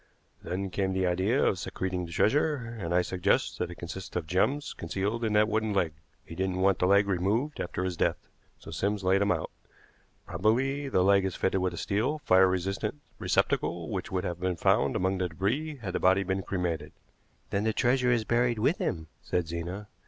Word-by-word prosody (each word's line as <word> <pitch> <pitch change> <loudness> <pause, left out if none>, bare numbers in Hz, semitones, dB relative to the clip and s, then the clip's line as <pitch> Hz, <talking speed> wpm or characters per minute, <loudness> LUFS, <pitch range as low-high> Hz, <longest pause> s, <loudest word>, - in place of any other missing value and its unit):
Then 95 +1 -4
came 95 0 0
the 95 0 +1
idea 95 +9 +2
of 95 - +1
secreting 90 -1 -3
the - - -11
treasure, 150 - +2 0.2
and 85 -4 -4
I 90 +1 +3
suggest 90 +2 0
that - - -1
it 85 - -8
consists 85 +2 -7
of 90 - -1
gems 100 - 0
concealed 100 +7 -3
in 110 -2 0
that 105 0 +4
wooden 110 -1 0
leg. 85 -5 +1 0.3
He - - -10
didn't 95 +1 -1
want 95 -1 +3
the 90 - +3
leg 100 +1 +4
removed 100 +10 0
after 90 +1 -3
his 90 -2 -2
death, - - 0 0.3
so - - -11
Sims 100 +4 -1
laid 95 +2 +3
him 100 - +3
out. - - -2 0.7
Probably 130 +10 0
the 90 -8 +3
leg 100 0 +4
is 95 -2 -2
fitted 95 0 0
with 90 -2 -1
a - - -10
steel, 110 - 0
fire 95 +1 +6
resisting 95 +7 -2 0.2
receptacle 85 +2 0
which 95 -3 -4
would 90 -1 -1
have 85 -1 -3
been 90 0 -1
found - - +2
among 95 +1 0
the 90 -1 0
débris 135 - -2
had 95 -5 -4
the - - 0
body 95 +1 +4
been 95 0 -1
cremated." 90 -4 -3 0.6
"Then 100 +1 0
the 110 - +2
treasure 125 +3 +2
is 120 -2 +2
buried 120 +1 +1
with 135 - +1
him," 80 -3 -2 0.2
said 90 -2 -1
Zena. 85 +5 -5
95 Hz, 205 wpm, -29 LUFS, 90-110 Hz, 0.7 s, fire